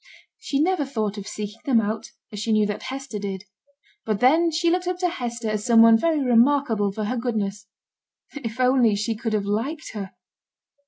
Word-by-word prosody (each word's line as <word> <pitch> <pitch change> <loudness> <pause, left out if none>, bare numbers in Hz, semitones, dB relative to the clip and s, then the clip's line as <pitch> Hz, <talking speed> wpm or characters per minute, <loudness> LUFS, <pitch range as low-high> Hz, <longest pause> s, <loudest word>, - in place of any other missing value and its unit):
She 290 -11 -2
never 350 0 +2
thought 220 -6 -3
of 200 - -9
seeking 210 +1 -6
them 255 -5 +4
out, 215 0 -3 0.2
as 210 - -6
she 220 +2 -2
knew 215 -1 +3
that 205 0 -3
Hester 265 -5 -6
did; 195 -1 -5 0.6
but 215 -2 -1
then 320 +7 +4
she 335 +1 +1
looked 360 0 0
up 360 0 -1
to 360 -1 0
Hester 240 -7 -4
as 215 -1 -2
some 230 -1 +6
one 230 0 +7
very 310 +4 +1
remarkable 240 -4 +3
for 215 +2 -4
her 215 +5 -2
goodness. 210 -4 -3 0.7
If 240 -4 -6
only 250 -4 +4
she 210 +3 -1
could 225 0 -3
have 205 -2 0
liked 235 +10 -3
her! 195 -3 -6
230 Hz, 195 wpm, -23 LUFS, 210-275 Hz, 0.7 s, one